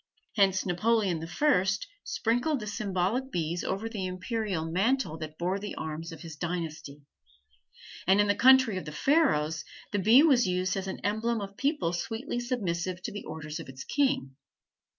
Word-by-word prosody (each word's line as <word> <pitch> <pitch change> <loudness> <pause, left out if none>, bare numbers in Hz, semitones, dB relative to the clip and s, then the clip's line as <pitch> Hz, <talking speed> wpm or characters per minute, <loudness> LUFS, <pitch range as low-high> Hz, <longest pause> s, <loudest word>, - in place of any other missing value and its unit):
Hence 195 -3 +3
Napoleon 190 -1 +1
the 165 - -6
First 195 - +2 0.2
sprinkled 245 +6 0
the 215 - -6
symbolic 205 +4 -1
bees 170 -1 -2
over 195 +4 -2
the 205 -5 -3
imperial 185 -2 -2
mantle 195 - +1
that 155 -1 -7
bore 180 +3 -1
the 205 0 -6
arms 160 +2 -5
of 165 -2 -10
his 165 -2 -8
dynasty; 155 -4 -5 1.0
and 190 +2 +5
in 205 - +5
the 205 - +3
country 255 -1 +6
of 185 - -5
the 150 - -6
Pharaohs 160 - +2 0.3
the 205 - 0
bee 230 +9 +7
was 260 -9 +5
used 185 +1 0
as 195 -1 -3
the 190 - -4
emblem 220 +3 0
of 200 -1 -5
a - - -24
people 275 - 0
sweetly 225 +8 -3
submissive 185 -7 -2
to - - -3
the 205 - -7
orders 155 0 -6
of 160 - -9
its 135 0 -8
king. 270 - 0
190 Hz, 175 wpm, -29 LUFS, 170-230 Hz, 1.0 s, bee